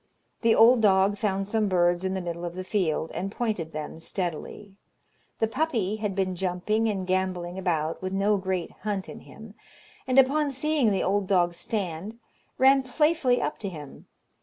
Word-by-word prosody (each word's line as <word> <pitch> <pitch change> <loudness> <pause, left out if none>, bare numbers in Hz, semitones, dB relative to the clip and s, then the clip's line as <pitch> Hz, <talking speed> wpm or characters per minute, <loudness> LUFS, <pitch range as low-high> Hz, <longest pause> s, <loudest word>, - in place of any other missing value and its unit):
The 230 -1 +4
old 235 +1 +6
dog 200 0 +3
found 195 -2 -1
some 215 0 +1
birds 175 -1 +2
in 190 0 -1
the 190 - -2
middle 170 -1 -5
of 175 0 -5
the 185 - -4
field, 175 -5 -1
and 195 +2 -4
pointed 210 -9 -2
them 155 +1 -6
steadily. 185 +3 -5 0.6
The - - +2
puppy 225 -5 -1
had 210 -3 -3
been 190 -1 -1
jumping 190 +5 0
and 195 -3 -2
gambolling 185 -1 -2
about, 165 -4 -1
with 185 0 -3
no 200 +2 +2
great 185 -2 -3
hunt 205 -3 -3
in - - -9
him, 220 -2 -13 0.5
and 255 0 +1
upon 285 +3 +4
seeing 280 -2 +1
the 195 -2 0
old 195 0 0
dog 175 -3 +2
stand, 185 +2 -4 0.4
ran 270 +1 +5
playfully 270 -1 +2
up - - -3
to 200 - -4
him. 150 -6 -11
195 Hz, 175 wpm, -26 LUFS, 180-225 Hz, 0.6 s, old